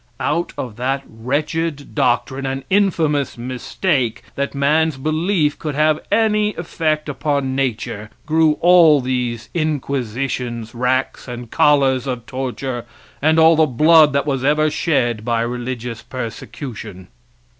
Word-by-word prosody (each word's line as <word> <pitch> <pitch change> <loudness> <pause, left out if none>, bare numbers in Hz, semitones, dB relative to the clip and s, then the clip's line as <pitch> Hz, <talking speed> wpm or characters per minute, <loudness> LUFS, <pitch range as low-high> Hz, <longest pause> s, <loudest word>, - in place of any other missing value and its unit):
Out 170 +4 -1
of 115 -4 -5
that 135 +3 -1
wretched 145 +6 -3
doctrine 130 +2 0
and 135 0 -3
infamous 160 -9 +1
mistake 125 - -2
that 140 0 -3
man's 150 +2 +2
belief 155 +2 0
could 150 -3 -4
have 155 +1 +3
any 210 -1 +2
effect 155 -2 -2
upon 140 -2 -1
nature 110 -5 -2 0.2
grew 160 0 +3
all 170 -4 +6
these 125 -3 -2
inquisitions, 130 -6 -2
racks 125 +3 -1
and 120 -1 -7
collars 135 -3 +3
of 125 -3 -4
torture, 130 -1 -4 0.4
and 155 +2 +3
all 160 0 +6
the 160 0 +4
blood 155 +3 +5
that 140 0 +1
was 135 -3 -1
ever 150 +2 +2
shed 120 -10 0
by 115 -1 0
religious 120 -1 -4
persecution. 115 -5 -7
140 Hz, 125 wpm, -19 LUFS, 125-155 Hz, 0.4 s, all